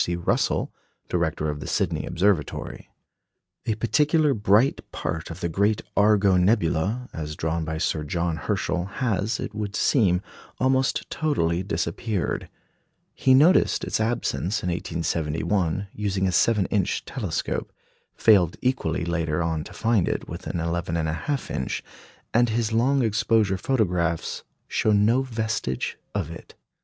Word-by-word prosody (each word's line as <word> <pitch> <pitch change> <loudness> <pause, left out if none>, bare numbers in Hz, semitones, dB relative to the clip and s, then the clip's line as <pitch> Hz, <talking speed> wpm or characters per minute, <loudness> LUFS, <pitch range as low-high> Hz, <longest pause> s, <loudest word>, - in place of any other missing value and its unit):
C. 85 - -1
Russell, 85 - 0 0.4
director 80 -3 0
of 75 -1 -3
the - - -7
Sydney - - -1
Observatory. 90 -5 -1 0.8
A 110 - +1
particularly 145 - +2
bright 105 +4 +3
part 80 0 -4
of 80 +2 -8
the 85 - 0
great 100 +6 +1
Argo 100 -2 +4
nebula, 100 +4 +1
as 75 -1 -5
drawn 80 +1 -1
by 80 0 -3
Sir 80 -1 -1
John 85 +2 -1
Herschel, 90 +4 -1
has, 105 0 -1
it - - -5
would 105 -1 -4
seem, 95 -8 +3 0.4
almost 130 +1 +1
totally 90 - 0
disappeared. 90 +3 -2 0.6
He 130 -1 +4
noticed 160 +8 +4
its - - -1
absence 110 -3 -1
in 90 - -1
1871, 85 +3 -1
using 100 -2 -1
a - - +1
7 105 +1 +3
inch 100 -4 0
telescope, - - -3 0.4
failed 95 -7 +4
equally 125 -11 0
later 85 -1 -1
on 80 -2 -1
to - - -10
find 115 -5 +1
it - - -2
with 85 +3 -7
an 85 - -2
11 85 0 -2
1/2 85 - -2
inch, 65 - -3 0.5
and 120 +1 +4
his 110 0 0
long 130 +4 +3
exposure 110 -3 +2
photographs 90 - 0 0.3
show 110 - +1
no 110 +5 +4
vestige 110 - -2 0.2
of 80 - -2
it. 85 - -11
95 Hz, 140 wpm, -25 LUFS, 85-115 Hz, 0.8 s, Argo